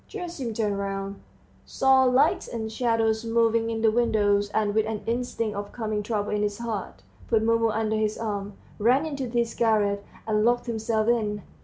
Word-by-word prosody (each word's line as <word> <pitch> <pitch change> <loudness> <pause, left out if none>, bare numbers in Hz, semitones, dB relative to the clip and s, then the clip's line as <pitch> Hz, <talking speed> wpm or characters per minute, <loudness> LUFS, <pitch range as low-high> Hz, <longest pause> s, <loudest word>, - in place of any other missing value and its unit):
Gerasim 340 - -5
turned 210 -3 -1
round, 195 0 -4 0.4
saw 265 0 +3
lights 260 +5 +3
and 220 -1 -4
shadows 225 -1 +1
moving 230 0 +2
in 225 0 -3
the 220 - +5
windows, 205 -3 +2
and 205 0 0
with 220 0 +2
an 220 -2 -4
instinct 230 -2 -2
of 205 0 -5
coming 215 -3 -2
trouble 210 -1 -2
in 210 0 0
his 205 -1 -1
heart, 210 - -5 0.2
put 220 -1 +2
Mumu 230 0 +3
under 220 0 0
his 215 0 0
arm, 205 -2 -4 0.3
ran 250 +8 +3
into 280 -4 -3
his 235 -1 0
garret, 205 -3 +1 0.2
and 210 -1 +1
locked 240 +1 +2
himself 220 -2 -1
in. 210 -3 0
220 Hz, 175 wpm, -26 LUFS, 210-235 Hz, 0.4 s, the